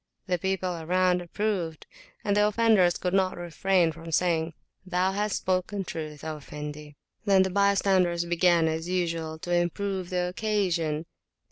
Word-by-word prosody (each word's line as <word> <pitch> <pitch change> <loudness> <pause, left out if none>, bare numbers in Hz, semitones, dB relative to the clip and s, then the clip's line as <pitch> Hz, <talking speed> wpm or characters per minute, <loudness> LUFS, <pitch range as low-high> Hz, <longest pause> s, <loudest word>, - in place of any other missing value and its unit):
The 180 -2 0
people 185 -2 -1
around 180 +2 +2
approved, 175 -3 -2 0.4
and 205 -1 +2
the 210 0 +4
offenders 210 -5 +3
could 180 0 -2
not 190 -1 +2
refrain 175 0 +1
from 165 +1 -9
saying, 165 -1 +1 0.3
Thou 185 0 0
hast 205 +1 -1
spoken 185 +2 -1
truth, 155 -4 -6
O 155 -1 -4
Effendi! 150 0 -8 0.3
Then 195 -2 +5
the 190 - -2
bystanders 190 -3 +2
began, 170 -1 +3
as 160 +2 -2
usual, 165 -3 -1
to 175 +2 -4
improve 180 +2 -1
the 180 -1 0
occasion. 180 -6 -1
180 Hz, 145 wpm, -27 LUFS, 165-190 Hz, 0.4 s, Then